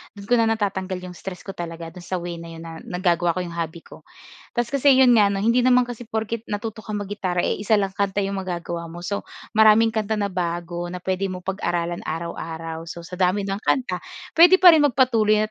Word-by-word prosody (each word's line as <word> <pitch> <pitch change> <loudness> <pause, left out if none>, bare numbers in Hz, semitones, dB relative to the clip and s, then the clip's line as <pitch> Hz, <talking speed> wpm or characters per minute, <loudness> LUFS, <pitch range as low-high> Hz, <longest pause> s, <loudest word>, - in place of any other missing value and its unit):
do'n 200 - -10
ko 240 +3 +2
na 225 - +3
natatanggal 195 -3 -2
yung 180 - -7
stress 180 +1 -8
ko 195 - -6
talaga 165 -2 -7
do'n 180 - -11
sa 185 - -2
way 175 -1 -5
na 170 - -9
'yon 165 - -9
na 165 -1 -8
nagagawa 175 -1 +1
ko 185 - -1
yung 170 - -7
hobby 170 0 -5
ko. - - -14 0.6
Tas 240 0 -1
kasi 280 0 +4
'yon 260 -1 +6
nga 210 -2 +6
'no 195 0 -2
hindi 235 +2 +3
naman 250 0 +5
kasi 245 0 -7
porke't 220 0 -3
natuto 210 +1 -4
ka 215 - -5
mag-gitara, 195 -3 -2
eh, - - -1
isa 210 +2 +2
lang 195 -2 0
kanta 200 -1 0
yung 195 0 -2
magagawa 170 -2 -4
mo. 175 +1 -9
So, 200 +3 -4 0.3
maraming 220 +1 +6
kanta 220 -1 -1
na 200 - +1
bago 175 -1 -3
na 180 - -5
pwede 190 +1 -1
mong 180 -1 -7
pag-aralan 175 -3 -2
araw-araw. 165 0 -5
So, 170 +1 -8
sa 180 +2 -8
dami 190 +2 +2
ng 195 0 -3
kanta 185 -9 0 0.4
pwede 355 +2 +9
pa 360 -1 +10
rin 315 -2 +5
magpatuloy 225 -5 +3
195 Hz, 220 wpm, -23 LUFS, 175-220 Hz, 0.6 s, pa